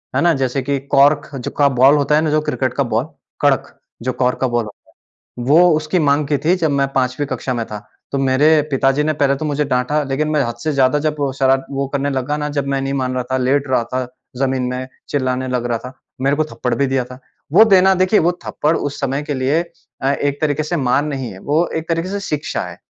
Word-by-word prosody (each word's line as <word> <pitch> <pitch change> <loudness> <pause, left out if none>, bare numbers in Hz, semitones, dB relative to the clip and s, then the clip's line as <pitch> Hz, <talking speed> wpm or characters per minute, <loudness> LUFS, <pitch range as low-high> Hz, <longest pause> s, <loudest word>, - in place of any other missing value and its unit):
है - - +2
ना? 170 0 +4
जैसे 135 -1 -1
कि 140 +1 -1
कॉर्क 145 +2 +4
ज 135 +1 -4
का 145 - +5
बॉल 135 +2 +5
होता 145 0 +2
है 155 - +3
ना 160 - 0
जो 155 0 +2
क्रिकेट 130 -4 -2
का 140 - +1
बॉल, 115 0 -1 0.4
कड़क, 140 -4 +1 0.2
जो 130 +2 -1
कॉर्क 125 0 +1
का 130 - +2
बॉल 120 -1 0
होता 105 - -15 0.5
है। - - -4
वो 165 +6 +6
उसकी 155 +3 -1
माँग 145 -2 +2
की 145 -1 +1
थी 165 +6 +2
जब 165 -4 0
मैं 140 -1 +1
5वीं 130 +2 0
कक्षा 130 -2 -3
में 115 -1 -2
था। 105 -1 -8 0.3
तो 140 - 0
मेरे 135 +3 +3 0.2
पिताजी 135 +1 +2
ने 155 - +1
पहले 140 -2 +1
तो 155 - -5
मुझे 150 0 0
डाँटा 135 +3 0
लेकिन 145 +3 -1
मैं 150 -2 +2
हद 120 -2 -3
से 155 - 0
ज़्यादा 135 +1 +3
जब 155 0 0 0.2
शरा 135 0 +4 0.2
वो 140 0 -2
करने 140 0 0
लगा 135 +2 -1
ना 150 0 -3
जब 140 - -1
मैं 140 0 -1
नहीं 135 0 -2
मान 130 -2 -1
रहा 125 - -1
था, - - +2
लेट 135 +2 +1
रहा 130 -2 +2
था 130 0 -1 0.3
ज़मीन 130 0 0
में, 125 +1 -3 0.2
चिल्लाने 130 -2 -1
लग 125 -1 -1
रहा 120 -1 -1
था, 125 +3 -9 0.3
मेरे 140 +2 +1
को 155 - +1
थप्पड़ 120 +1 -1
भी 140 - +1
दिया 135 -1 0
था। 125 +1 -11 0.3
वो 205 +7 +8
देना 190 -3 +5
देखिए, 185 +3 +3
वो 175 +2 +2
थप्पड़ 155 +2 0
उस 145 0 -4
समय 140 +1 -1
के 145 0 -4
लिए 135 +5 +1 0.4
अ, 135 +1 +2
एक 145 0 -2
तरीके 155 -1 0
से 155 +3 -2
मार 135 0 +1
नहीं 135 -5 -4
है, 95 - -11
वो 155 - +1
एक 160 +1 -4
तरीके 165 +1 -1
से 200 +1 -3
शिक्षा 150 -6 -3
है। - - -11
140 Hz, 250 wpm, -18 LUFS, 130-150 Hz, 0.5 s, वो